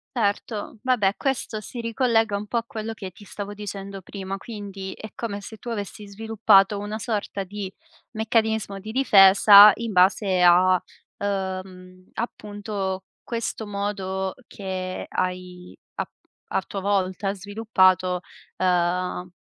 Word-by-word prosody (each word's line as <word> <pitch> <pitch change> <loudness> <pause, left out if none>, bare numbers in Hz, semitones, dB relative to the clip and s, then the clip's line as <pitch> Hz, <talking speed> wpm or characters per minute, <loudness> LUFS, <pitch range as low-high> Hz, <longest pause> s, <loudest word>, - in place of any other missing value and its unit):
Certo. 210 0 -2
Vabbè, 215 -6 +2
questo 250 -5 -2
si 240 - -8
ricollega 230 -2 +1
un 205 +1 -3
po' 235 - -2
a 230 - -1
quello 220 0 -5
che 190 -4 -8
ti 190 +4 -16
stavo 205 +1 -7
dicendo 200 -1 -7
prima. 195 +1 -6
Quindi 195 -2 -7
è 215 - -10
come 205 -3 -4
se 220 +2 -9
tu 240 - -9
avessi 205 -2 -5
sviluppato 205 -1 +3
una 210 +2 -4
sorta 205 -3 -3
di 195 0 -6 0.4
meccanismo 220 -2 0
di 215 +3 -7
difesa 205 -3 +8
in 230 -2 -4
base 185 0 +3
a, 180 +1 +5 0.4
uhm, 185 -2 -5
appunto 205 -4 -4 0.2
questo 230 -2 -4
modo 195 -2 -3
che 185 -2 -5
hai 180 -1 -4 0.2
a - - -2 0.5
a - - +2
tua 195 - -5
volta 195 0 0
sviluppato, 185 -3 +2 0.4
ehm, 180 0 0
200 Hz, 130 wpm, -24 LUFS, 190-215 Hz, 0.5 s, difesa